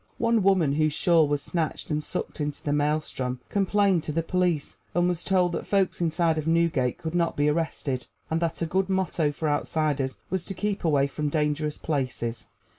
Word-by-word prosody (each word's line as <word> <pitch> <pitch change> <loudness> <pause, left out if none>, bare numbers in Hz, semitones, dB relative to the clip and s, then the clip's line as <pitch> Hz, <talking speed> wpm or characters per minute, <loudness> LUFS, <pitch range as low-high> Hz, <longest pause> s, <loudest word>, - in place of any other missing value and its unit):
One 230 -1 +2
woman 185 -7 +3
whose 155 0 +2
shawl 165 -2 +4
was 145 -1 -1
snatched 165 -2 -3
and 150 0 0
sucked 150 - -4
into 145 0 -3
the 145 - 0
maelstrom 145 -4 0
complained 200 -2 +2
to - - -2
the 165 +2 0
police, 175 -3 0 0.2
and 175 0 +3
was 175 -1 -1
told 180 -2 +2
that - - -4
folks 195 -3 +1
inside 165 -1 +1
of 155 - -4
Newgate 165 -7 +2
could 160 0 -5
not 170 -1 0
be 145 +1 +3
arrested, 150 -4 -2 0.2
and 160 - 0
that 165 0 -1
a - - +1
good 185 +4 0
motto 180 -5 +1
for 155 +2 -3
outsiders 145 -2 0
was 190 -2 -1
to 195 - -6
keep 205 +1 -2
away 145 -4 +3
from 150 +1 -2
dangerous 150 0 0
places. 125 -6 -3
160 Hz, 190 wpm, -26 LUFS, 145-175 Hz, 0.2 s, shawl